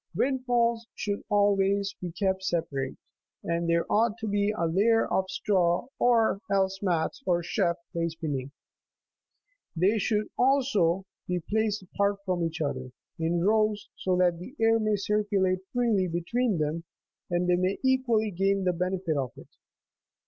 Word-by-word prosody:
Windfalls 240 -3 +1
should 205 -1 -3
always 200 -1 +2
be 180 -2 -4
kept 190 +2 -1
separate, 140 -7 -2 0.5
and 170 0 -1
there 170 0 +2
ought 225 +1 +2
to 225 -1 -5
be 205 0 +1
a 210 -5 -1
layer 210 +7 +3
of 190 - +1
straw, 190 +2 +1
or 230 -4 +3
else 195 -1 +1
mats 180 - -1
or 175 -1 +2
chaff, 175 -1 0 0.2
placed 170 -1 -2
beneath. 140 -4 -3 1.3
They 195 +6 +2
should, 210 +1 0
also, 230 -10 +2 0.2
be 180 0 0
placed 215 -1 0
apart 200 +2 0
from 180 -3 0
each 165 0 -3
other, 130 -3 -3 0.3
in 170 +1 0
rows, 215 +1 +1
so 185 -1 0
that 175 -2 +2
the 250 +11 -10
air 225 0 +4
may 215 -1 +1
cir 210 +1 0
culate 190 -2 +1
freely 230 -7 +1
between 190 +6 0
them, 155 +2 -2 0.5
and 175 0 0
they 180 - +4
may 185 +2 0
equally 245 -5 +2
gain 195 +2 +1
the 180 -1 +2
benefit 180 -1 -1
of 130 -3 -2
it. - - -13
195 Hz, 155 wpm, -28 LUFS, 175-215 Hz, 1.3 s, air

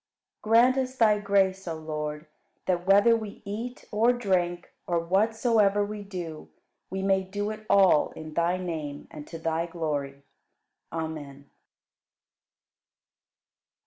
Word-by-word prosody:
47. 215 - -5 0.2
Grant 260 -1 -1
us 260 - -17
Thy 215 -3 +4
grace, 195 -2 +1
O 165 - -2
Lord, 150 -1 -5 0.4
that, 180 -1 -1
whether 205 +4 +6
we 215 -3 -6
eat 230 +5 -6
or 225 +3 +4
drink, 180 -7 -1
or 175 - +1
whatsoever 205 +3 +2
we 210 0 -6
do, 175 -6 -7 0.4
we 190 0 -3
may 195 0 +3
do 205 +3 -3
it 215 0 -9
all 190 -6 +5
in 155 -1 -9
Thy 170 +3 +1
name 155 -5 -5
and 150 0 -9
to 165 - -7
Thy 165 +1 -1
glory. 145 -5 -3 0.7
Amen. 150 -4 -6
185 Hz, 130 wpm, -27 LUFS, 160-205 Hz, 0.7 s, whether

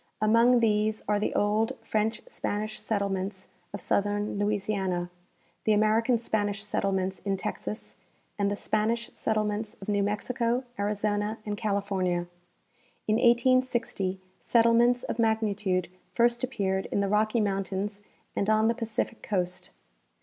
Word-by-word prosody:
Among 230 +3 +5
these 215 -1 +1
are 210 0 +2
the 210 - 0
old 210 +2 +2
French 220 +1 -1
Spanish 215 +1 -3
settlements 200 -2 -2 0.2
of 200 - -5
southern 205 0 0
Louisiana, 195 -4 -1 0.5
the 215 - +3
American 220 +3 +3
Spanish 210 -2 -1
settle 200 -1 -1
ments 190 -1 -1
in 195 +1 -1
Texas, 210 +2 -5 0.5
and 200 0 +2
the 200 - -1
Spanish 220 +3 -1
settlements 215 0 -1
of 195 - -10
New 205 -1 +1
Mexico, 235 +4 0 0.2
Arizona 205 +1 0
and 210 -1 -2
California. 200 -4 -1 0.8
In 215 0 +3
1860 240 -5 +2 0.2
settlements 235 +1 +4
of 230 - -4
magnitude 210 -5 +1 0.3
first 240 0 +3
appeared 195 -7 -1
in - - -1
the 200 - +1
Rocky 215 +3 +2
mountains 200 0 -2 0.3
and 200 - 0
on 215 +1 +4
the - - +3
Pacific 230 -1 -3
coast. 180 -3 -2
210 Hz, 130 wpm, -28 LUFS, 200-225 Hz, 0.8 s, Among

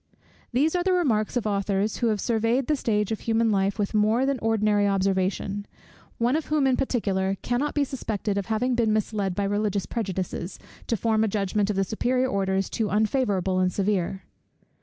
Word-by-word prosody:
These 290 +7 +2
are 355 - +2
the 375 +1 +2
remarks 245 - +1
of 240 - -2
authors, 200 0 0
who 235 - +1
have 215 -2 +1
surveyed 230 +4 +1
the 305 - +1
stage 210 -5 0
of 220 - -2
human 225 0 +1
life 195 0 +1
with 205 0 -1
more 215 +4 +3
than 275 -2 0
ordinary 210 -2 +2
observation; 195 +1 0 0.5
one 240 +4 +2
of 315 - -1
whom 300 -2 +2
in 260 -1 +3
particular 195 -7 0
cannot 250 +5 -1
be 290 - +3
suspected 220 -6 -3
of 200 -1 -2
having 235 +3 0
been 230 -3 +2
misled 205 -3 -1
by 200 - -1
religious 205 -1 0
prejudices, 190 -4 -4 0.3
to 230 - 0
form 220 0 +1
a - - +2
judgment 200 0 0
of 210 - 0
the 195 - +2
superior 250 +6 0
orders 195 -1 0
too 220 -3 -2
unfavourable 205 -4 +1
and 185 0 +2
severe. 195 -1 -1
215 Hz, 185 wpm, -25 LUFS, 195-240 Hz, 0.5 s, more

